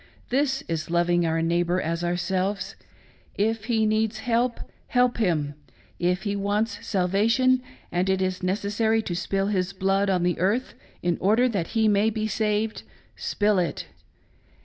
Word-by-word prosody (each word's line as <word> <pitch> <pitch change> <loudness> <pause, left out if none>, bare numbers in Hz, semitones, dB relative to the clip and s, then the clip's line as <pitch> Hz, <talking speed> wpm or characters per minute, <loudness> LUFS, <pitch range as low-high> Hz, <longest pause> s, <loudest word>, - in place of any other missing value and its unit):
This 270 +1 +1
is 165 -1 -3
loving 175 0 +2
our 165 0 0
neighbor 175 +2 +1
as 170 0 -2
ourselves; 185 +2 -1 0.6
if 220 +1 0
he 225 -2 +2
needs 215 0 +1
help, 235 +2 0 0.3
help 250 -1 +2
him; 155 -8 +1 0.5
if 180 +1 0
he 205 -1 -1
wants 205 +2 -1
salvation, 225 +8 +2 0.3
and 180 +2 0
it 190 0 +2
is 185 0 -1
necessary 205 +4 0
to 175 - -3
spill 195 +2 -1
his 190 -1 -1
blood 195 +1 +1
on 180 -2 +1
the 175 0 0
earth 210 +9 0 0.3
in 175 -1 0
order 220 +6 +3
that 195 -8 -1
he 220 -1 +4
may 210 +1 +3
ber 215 0 -2
saved, 215 +1 -1 0.3
spill 205 -2 +1
it. 170 -4 -2
200 Hz, 150 wpm, -25 LUFS, 180-220 Hz, 0.6 s, he